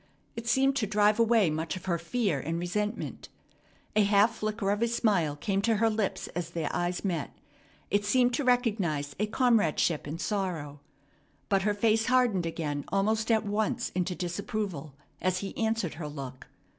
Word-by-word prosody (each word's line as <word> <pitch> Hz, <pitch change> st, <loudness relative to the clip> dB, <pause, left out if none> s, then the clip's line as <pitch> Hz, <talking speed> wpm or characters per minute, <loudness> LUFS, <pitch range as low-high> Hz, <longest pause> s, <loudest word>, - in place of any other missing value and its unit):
It 230 Hz, 0 st, -6 dB
seemed 270 Hz, +3 st, +3 dB
to 220 Hz, -6 st, 0 dB
drive 210 Hz, +1 st, +3 dB
away 225 Hz, -6 st, +4 dB
much 160 Hz, +2 st, -2 dB
of 185 Hz, -, -8 dB
her 170 Hz, -3 st, 0 dB
fear 190 Hz, -, 0 dB
and 165 Hz, +5 st, -3 dB
resentment. 210 Hz, +6 st, -3 dB, 0.7 s
A 215 Hz, -, +5 dB
half 205 Hz, +2 st, +4 dB
flicker 210 Hz, -2 st, -1 dB
of 205 Hz, +2 st, -1 dB
a 235 Hz, -, +3 dB
smile 200 Hz, -10 st, +1 dB
came 195 Hz, +7 st, -1 dB
to 225 Hz, +2 st, +2 dB
her 225 Hz, +2 st, +2 dB
lips 215 Hz, -3 st, -2 dB
as 175 Hz, -1 st, -4 dB
their 165 Hz, -3 st, -3 dB
eyes 175 Hz, +2 st, -1 dB
met. 170 Hz, -6 st, -2 dB, 0.6 s
It 205 Hz, 0 st, +2 dB
seemed 245 Hz, +4 st, +3 dB
to 285 Hz, -, 0 dB
recognize 205 Hz, -, +1 dB
a 210 Hz, -, +1 dB
comradeship 210 Hz, -, +2 dB
in 150 Hz, +3 st, -4 dB
sorrow. 170 Hz, -7 st, -3 dB, 0.7 s
But 195 Hz, -1 st, +3 dB
her 205 Hz, +1 st, +1 dB
face 220 Hz, +1 st, +2 dB
hardened 245 Hz, -9 st, +3 dB
again 150 Hz, -3 st, -3 dB
almost 215 Hz, +4 st, 0 dB
at 220 Hz, -1 st, +3 dB
once 220 Hz, +4 st, -1 dB
into 180 Hz, 0 st, -1 dB
disapproval 180 Hz, -5 st, -4 dB, 0.3 s
as 185 Hz, 0 st, +1 dB
he 200 Hz, -, -6 dB
answered 225 Hz, -6 st, 0 dB
her 155 Hz, -1 st, -6 dB
look. 135 Hz, -3 st, -8 dB
200 Hz, 170 wpm, -29 LUFS, 170-220 Hz, 0.7 s, A